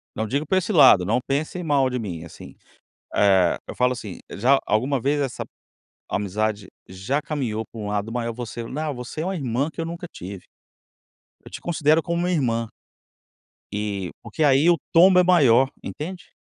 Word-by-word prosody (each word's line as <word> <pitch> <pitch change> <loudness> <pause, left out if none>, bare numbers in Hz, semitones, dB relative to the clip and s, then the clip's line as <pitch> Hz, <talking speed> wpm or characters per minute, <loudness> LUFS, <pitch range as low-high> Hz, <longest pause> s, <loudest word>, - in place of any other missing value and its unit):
Não 110 - -2
digo 140 +6 -1
pra 190 - +1
esse 195 +3 -1
lado, 130 - +7
não 115 +5 +1
pensem 155 +6 -2
mal 140 -4 +2
de 125 - -2
mim, 90 -8 -5
assim. 85 - -12 0.6
Eh, 95 -4 +4
eu - - -7
falo, 125 0 +2
assim, 110 -7 -7
já 130 +6 +3
alguma 130 +6 +1
vez 145 +4 +1
essa 135 -3 -4 0.6
amizade 105 +1 -2 0.2
já 95 +11 -2
caminhou 120 -9 -3
pra 115 - -9
um 105 - -5
lado 105 +1 -2
maior, 115 -1 -2
"você 120 0 -6
não, 150 +5 -3
você 125 +4 -7
é - - -1
uma 190 0 -2
irmã 135 -1 -1
que 165 - -7
eu - - -1
nunca 170 +1 -6
tive. 95 +1 -8 1.0
Eu - - -12
te - - -8
considero 160 -1 +2
como 170 0 -2
uma 180 +1 0
irmã". 115 -8 0 1.1
Eh, 100 -3 -3
porque 160 - -3
aí 145 +3 +5
o 170 - +4
tombo 180 +2 +7
é - - +6
maior, 135 -8 +5
entende? 180 +4 -7
130 Hz, 180 wpm, -23 LUFS, 110-155 Hz, 1.1 s, lado